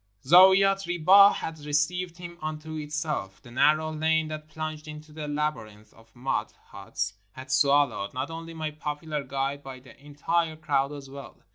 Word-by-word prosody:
Zaouiat 190 +4 +6
Ribah 185 +4 +6
had 160 -1 -5
received 160 +4 -1
him 175 -1 -10
unto 155 0 -5
itself. 150 -10 -4
The 120 - -14
narrow 155 +5 +3
lane 160 0 +1
that 155 0 -7
plunged 155 -1 -6
into 150 0 -10
the 150 -1 -6
laby 150 +1 -1
rinth 105 0 -18
of 115 +1 -22
mud 130 +2 -2 0.2
huts 100 +1 -4 0.2
had 130 0 -9
swallowed, 135 -7 +2
not 130 +5 -4
only 165 0 -8
my 155 -1 -3
popular 150 0 -4
guide 135 +1 -3
but 130 -2 -10
the 135 - -15
entire 160 +3 -1
crowd 145 -3 0
as 140 -2 -9
well. 140 0 -11
150 Hz, 165 wpm, -27 LUFS, 135-160 Hz, 0.2 s, Zaouiat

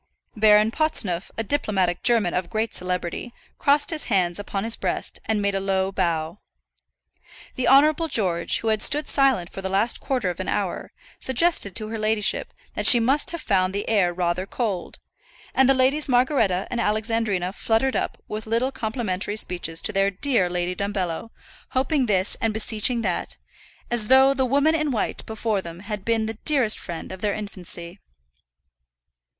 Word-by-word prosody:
Baron 215 0 +5
Potsneuf, 210 - 0
a 225 - -1
diplomatic 195 -8 0
German 225 -7 +2
of 180 -1 -2
great 220 +3 -2
celebrity, 180 +5 -4 0.2
crossed 290 +2 +3
his 315 -2 -1
hands 185 -4 0
upon 200 -1 -4
his 225 0 +2
breast - - -3
and 215 -2 0
made 200 0 +1
a 195 - 0
low 190 0 0
bow. 170 -1 -2 1.1
The 255 - -2
Honourable 305 +4 +5
George, 180 - +1
who 225 - -1
had 215 -1 +1
stood 295 +4 +1
silent 265 -11 +2
for 195 - -7
the 190 - -3
last 200 +5 +1
quarter 250 -9 -1
of 175 - -10
an 185 - -4
hour, 200 -4 -2 0.3
suggested 260 - +1
to 215 -1 -2
her 225 0 -4
ladyship 215 -1 0 0.2
that - - 0
she 245 - +8
must 265 +6 +1
have 335 -2 -6
found 190 -1 +1
the 200 - -3
air 200 -5 +2
rather 175 +1 -2
cold; 205 -8 -3 0.6
and 265 0 +4
the 270 - +5
Ladies 270 +3 +2
Margaretta 245 -7 +2
and 240 -1 -1
Alexandrina 210 -4 0
fluttered 230 +5 0
up - - -2
with 215 +1 -6
little 235 +4 0
complimentary 215 -5 -3
speeches 175 -5 -3
to - - +2
their 195 0 +2
dear 200 -1 +1
Lady 175 0 -2
Dumbello, 200 0 -3 0.5
hoping 270 0 +1
this 190 -2 +1
and 225 -1 0
beseeching 220 +2 +1
that, 180 -4 -2 0.5
as 230 -3 +2
though 265 +2 +6
the 265 -1 0
"Woman 285 +5 +3
in 305 -2 0
White" 240 -5 -2
before 220 -2 -1
them 170 0 -9
had 205 -1 -5
been 225 0 0
the 220 0 -6
dearest 265 -8 +2
friend 170 0 -7
of 190 0 -8
their 205 -1 0
infancy. 185 -3 -4
215 Hz, 170 wpm, -23 LUFS, 185-245 Hz, 1.1 s, she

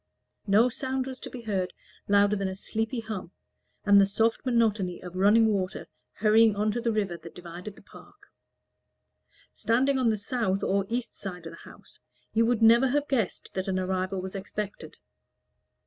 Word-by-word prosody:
No 210 +5 +5
sound 260 +1 -3
was 260 -1 -7
to - - -8
be 250 - -8
heard 195 -5 -2 0.3
louder 205 +1 +4
than 195 -1 -2
a 190 - -4
sleepy 225 +4 -3
hum, 215 -6 -6 0.6
and 200 -1 +7
the 195 - +4
soft 225 +3 0
monotony 220 -7 +1
of 180 0 -10
running 205 +4 +5
water 195 -2 -2 0.3
hurrying 215 +1 +4
on 210 +1 +1
to 240 - -3
the 230 -1 0
river 200 -5 -1
that 165 -1 -12
divided 180 +3 -9
the - - -17
park. - - -17 1.2
Standing 255 +5 +1
on 245 -3 +3
the 215 - +1
south 205 -2 -1
or 195 0 +1
east 240 +1 -3
side 180 -3 -7
of 165 - -7
the 165 - -13
house, - - -16 0.3
you 225 +1 +3
would 235 -2 +1
never 235 +4 +6
have 290 +3 0
guessed 230 -9 -2
that 190 0 -3
an 190 -1 0
arrival 185 0 -1
was 185 0 -6
expected. 205 +1 -6
210 Hz, 180 wpm, -27 LUFS, 190-230 Hz, 1.2 s, and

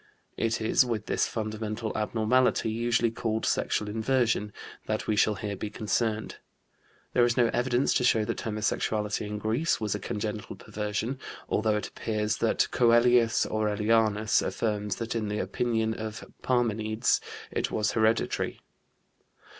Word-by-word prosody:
It 115 0 0
is 110 +3 +4
with 115 -4 -3
this - - +1
fundamental 110 0 -4
abnormality, 110 +2 +2
usually 115 0 +1
called 110 -1 -2
sexual 105 - 0
inversion, 110 -1 +1 0.4
that - - -1
we 110 - +1
shall 105 0 +3
here 105 -1 -4
be 105 +2 -5
concerned. 110 +1 -1 0.8
There 125 - +4
is 120 +1 +2
no 120 -2 +4
evidence 125 +1 +2
to - - +1
show 110 -3 +3
that - - -3
homosexuality 105 -1 -1
in 105 0 -4
Greece 110 +10 0
was 105 -3 -1
a 105 - -3
congenital 105 +1 -4
perversion, 105 +5 -3 0.3
although 110 0 +1
it 105 - -4
appears 110 -1 -2
that 115 - +2
Coelius 120 -1 +4
Aurelianus 110 0 +2
affirms 105 -3 -1
that 115 -1 -4
in 110 -2 -2
the 105 +1 -2
opinion 110 -1 0
of 110 -1 -6 0.2
Parmenides 110 -3 +1 0.3
it - - -1
was 105 0 0
hereditary. 110 0 +1
110 Hz, 140 wpm, -28 LUFS, 105-115 Hz, 0.8 s, is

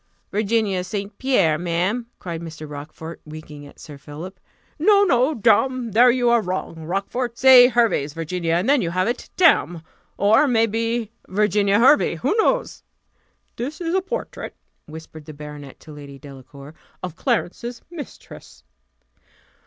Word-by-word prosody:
"Virginia 210 -3 0
St. 200 +2 -5
Pierre! 195 - +2
ma'am," 180 +8 -1
cried 170 -2 -6
Mr. 155 -2 -8
Rochfort, 150 +3 -9
winking 150 -1 -11
at - - -18
Sir 145 -2 -11
Philip. 165 +7 -10 0.4
"No, 405 +5 +5
no, 275 -3 +2
damme! 235 +2 +2
there 240 +5 +6
you 245 0 +1
are 235 -1 +4
wrong, 180 -4 -5
Rochfort; 225 +7 -3
say 260 -2 +8
Hervey's 225 - +1
Virginia, 165 +1 -3
and 175 +6 0
then 280 -1 +4
you 170 - -2
have 185 +3 0
it, 240 +1 -4
damme! 175 - +3 0.3
or, 220 +8 +4
may 230 -3 +3
be, 230 0 -2 0.2
Virginia 205 0 +2
Hervey 265 +6 +4
who - - -1
knows?" - - 0 0.8
"This 275 +6 -5
is 335 -1 -3
a 380 - +2
portrait," 475 +6 -6 0.3
whispered 155 -1 -11
the 155 - -10
baronet 150 -2 -10
to 155 - -13
Lady 140 -2 -11
Delacour, 140 +1 -13 0.3
"of 180 -3 -5
Clarence's 235 +1 -3
mistress." 325 -4 -11
200 Hz, 145 wpm, -21 LUFS, 160-245 Hz, 0.8 s, say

